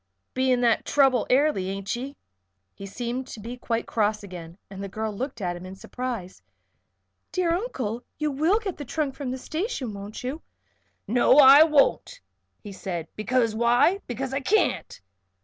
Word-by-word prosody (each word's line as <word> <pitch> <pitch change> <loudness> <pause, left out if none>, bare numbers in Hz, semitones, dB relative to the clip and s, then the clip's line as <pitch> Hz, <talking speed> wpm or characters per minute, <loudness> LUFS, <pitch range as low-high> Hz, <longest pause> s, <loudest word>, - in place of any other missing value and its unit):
Beginning 255 -1 +2
that 235 -2 +3
trouble 270 -5 +3
airly; 255 -8 +2
ain't 195 +2 -3
ye?" 270 +4 -6 0.6
He 195 - -9
seemed 245 +5 -4
to 230 - -9
be 230 +4 -7
quite 235 -2 -2
cross 215 -1 0
again, 175 -3 -9
and 195 0 -8
the - - -4
girl 215 +1 -4
looked 255 0 -5
at 175 -2 -2
him 175 - -9
in 185 +1 -8
surprise. 230 -3 -6 0.9
"Dear 355 -2 +1
Uncle! 255 - -3
You 305 -1 -1
will 315 +9 +2
get 410 -5 -4
the 290 - -6
trunk 290 +1 -2
from 275 -2 -5
the 255 - -3
station, 310 - -4
won't 200 +3 -8
you?" 270 +6 -4 0.7
"No 245 +5 +4
I 280 0 +9
won't," 315 - +3 0.4
he 205 - -8
said. 175 -4 -5
"Because 230 +1 +1
why? 240 - +3
Because 260 +2 -4
I 270 - 0
can't." 370 - 0
245 Hz, 165 wpm, -25 LUFS, 205-280 Hz, 0.9 s, I